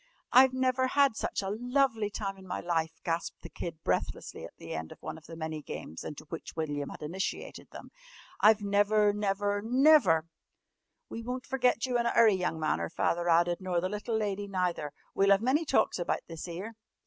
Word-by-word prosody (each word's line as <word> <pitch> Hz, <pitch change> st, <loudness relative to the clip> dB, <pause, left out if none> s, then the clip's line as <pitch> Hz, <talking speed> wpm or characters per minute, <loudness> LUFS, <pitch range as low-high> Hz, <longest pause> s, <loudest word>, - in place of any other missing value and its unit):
"I've 260 Hz, +1 st, +7 dB
never 260 Hz, 0 st, +1 dB
had 275 Hz, -2 st, +3 dB
such 205 Hz, -, -2 dB
a 195 Hz, -, -2 dB
lovely 245 Hz, -1 st, +1 dB
time 200 Hz, -1 st, -4 dB
in 190 Hz, -1 st, -14 dB
my -, -, -3 dB
life," 165 Hz, -2 st, -2 dB
gasped 170 Hz, +1 st, -3 dB
the -, -, -8 dB
Kid 165 Hz, -2 st, -7 dB
breathlessly -, -, -2 dB
at -, -, -10 dB
the -, -, -8 dB
end 80 Hz, 0 st, -5 dB
of -, -, -12 dB
one 155 Hz, -, -5 dB
of 160 Hz, -1 st, -14 dB
the 165 Hz, -, -9 dB
many 160 Hz, -1 st, -4 dB
games 80 Hz, -, -7 dB
into 150 Hz, -, -7 dB
which 165 Hz, -, -7 dB
William 145 Hz, -3 st, -3 dB
had -, -, -9 dB
initiated 180 Hz, +5 st, -4 dB
them. -, -, -11 dB, 0.5 s
"I've 215 Hz, 0 st, +5 dB
never, 205 Hz, +1 st, +3 dB
never, 205 Hz, 0 st, 0 dB
never 235 Hz, -, +5 dB, 0.4 s
" -, -, -54 dB
"We 230 Hz, -, -5 dB
won't 250 Hz, +2 st, -5 dB
ferget 255 Hz, -2 st, +2 dB
you 250 Hz, -2 st, 0 dB
in 235 Hz, -, +1 dB
a -, -, 0 dB
'urry, 225 Hz, -3 st, +6 dB
young 180 Hz, -3 st, -1 dB
man," 155 Hz, -, 0 dB
her -, -, -3 dB
father 170 Hz, +1 st, 0 dB
added, 170 Hz, +2 st, +3 dB
"nor 185 Hz, -2 st, 0 dB
the 185 Hz, +2 st, -2 dB
little 210 Hz, +2 st, -2 dB
lady 205 Hz, -1 st, -2 dB
neither. 180 Hz, -6 st, -1 dB, 0.2 s
We'll 195 Hz, 0 st, +3 dB
'ave 200 Hz, +2 st, +4 dB
many 285 Hz, +7 st, +2 dB
talks 270 Hz, -, +2 dB
about 175 Hz, -, -1 dB
this 165 Hz, +1 st, -7 dB
'ere!" 185 Hz, +7 st, -6 dB
200 Hz, 205 wpm, -30 LUFS, 170-230 Hz, 0.5 s, I've